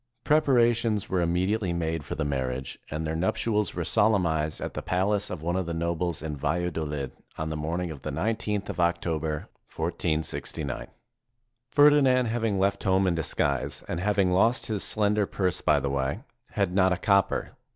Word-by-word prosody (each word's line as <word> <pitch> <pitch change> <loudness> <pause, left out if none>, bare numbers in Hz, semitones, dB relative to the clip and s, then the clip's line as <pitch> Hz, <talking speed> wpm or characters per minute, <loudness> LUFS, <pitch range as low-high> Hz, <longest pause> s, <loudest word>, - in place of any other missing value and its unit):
Prepara 130 -6 +4
tions 110 -3 -1
were 95 -1 +1
immediately 90 +3 0
made 80 -2 -2
for 70 - -5
the 80 - -2
marriage, 65 -2 -3
and 80 +1 -3
their 80 +1 -2
nuptials 105 +5 0
were 85 - -1
solemnized 85 -7 +1
at - - -5
the - - -4
palace 100 +3 0
of 80 -4 -6
one 85 +2 0
of 95 -2 -1
the 85 - -3
nobles 85 -1 -2
in 75 -2 -3
Valladolid, 75 -2 -2 0.3
on 80 0 -3
the - - -2
morning 85 +3 -2
of 70 - -9
the - - -4
19th 105 +5 -1
of - - -5
Octo 85 -2 +1
ber, 80 0 -2 0.4
1469. 80 -5 -3 0.8
Ferdinand, 140 -3 +5
having 115 -3 0
left 100 +1 +1
home 95 0 +3
in 90 - +2
disguise, 70 -4 -1
and 85 - -3
having 100 -1 +2
lost 110 +7 +3
his 105 -3 -2
slender 105 -1 +2
purse 90 -2 -1
by 75 -2 +3
the 70 0 -2
way, 70 +8 -1 0.3
had 100 -3 0
not 95 -1 +4
a 90 - +1
copper. 100 0 +2
90 Hz, 175 wpm, -27 LUFS, 80-105 Hz, 0.8 s, Ferdinand